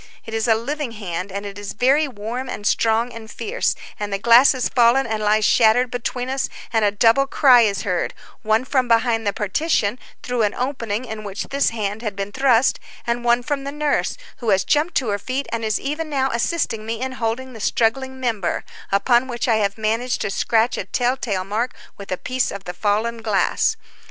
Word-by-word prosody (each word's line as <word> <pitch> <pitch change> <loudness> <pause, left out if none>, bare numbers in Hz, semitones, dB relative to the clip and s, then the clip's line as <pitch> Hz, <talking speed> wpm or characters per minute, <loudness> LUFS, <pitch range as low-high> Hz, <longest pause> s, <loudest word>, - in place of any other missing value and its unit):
It 225 - -8
is 225 +1 0
a 225 - +5
living 270 +2 -3
hand, 190 -3 -5
and 200 +1 -5
it 200 0 -7
is 205 - -6
very 275 +7 +3
warm 245 +2 -5
and 205 - -6
strong 225 +3 +2
and 225 -1 -9
fierce, 450 - -1 0.2
and 205 -1 -3
the 195 - 0
glass 235 +7 +6
has 255 -2 -1
fallen 245 +2 +4
and 220 -1 -2
lies 215 0 +3
shattered 235 +2 +4
between 245 +1 -3
us, 265 +1 -1 0.2
and 225 -1 +3
a 205 - +4
double 230 +6 +3
cry 260 -3 +6
is 200 -4 +1
heard, 180 -3 -1 0.3
one 220 +3 +1
from 260 -2 +1
behind 230 -1 +2
the - - +3
partition, 215 - 0 0.2
through 245 -1 -1
an 210 -1 +1
opening 245 -3 -2
in 220 -2 -6
which 200 -1 -4
this 280 0 +2
hand 210 -1 -3
had 215 -4 -4
been 200 +1 -4
thrust, 260 0 +3 0.3
and 235 0 -1
one 240 0 +3
from 280 +1 -2
the 280 - -4
nurse, 295 0 -1 0.2
who 235 - -3
has 190 -2 +3
jumped 305 - +1
to 250 -5 +1
her 205 0 -1
feet 260 +6 -3
and 230 0 -2
is 215 -1 0
even 305 +3 -3
now 270 -2 0
assisting 235 -2 -1
me 225 +1 -4
in 260 +1 -3
holding 255 +1 -3
the 225 - -10
struggling 260 +5 0
member, 225 -8 -1 0.3
upon 240 +6 +3
which 240 -1 -3
I 225 -2 +3
have 200 -1 0
managed 225 +3 -1
to 205 - -2
scratch 225 +4 +1
a - - -3
tell 245 +1 0
tale 200 -8 -2
mark 220 +6 -2 0.2
with 200 - -9
a 185 - 0
piece 255 +4 -1
of 200 -1 -7
the 180 - -6
fallen 220 +4 -1
glass. 220 - +1
230 Hz, 210 wpm, -21 LUFS, 210-255 Hz, 0.3 s, glass